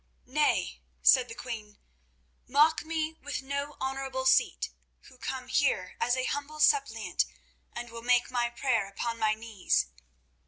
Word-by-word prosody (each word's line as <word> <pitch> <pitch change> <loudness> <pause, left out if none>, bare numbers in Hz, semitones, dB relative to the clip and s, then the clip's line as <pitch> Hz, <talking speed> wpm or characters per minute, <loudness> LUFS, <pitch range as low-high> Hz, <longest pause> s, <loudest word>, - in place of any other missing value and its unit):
"Nay," 295 +4 +1 0.2
said 255 -2 +6
the 230 - -7
queen, 215 -5 -7 0.7
"mock 300 +5 +4
me 320 0 -3
with 285 -1 -4
no 280 +2 -4
honourable 265 0 -3
seat 260 0 +3 0.3
who 255 -1 -18
come 255 +1 -4
here 190 -10 +1
as 245 +1 +2
a 255 - 0
humble 290 +3 -3
suppliant, 355 +8 +2 0.5
and 240 0 -6
will 230 0 -7
make 245 +1 +2
my 240 -1 +1
prayer 235 -3 0
upon 230 +3 -3
my 215 -1 +2
knees." 220 -3 0
255 Hz, 145 wpm, -29 LUFS, 235-285 Hz, 0.7 s, said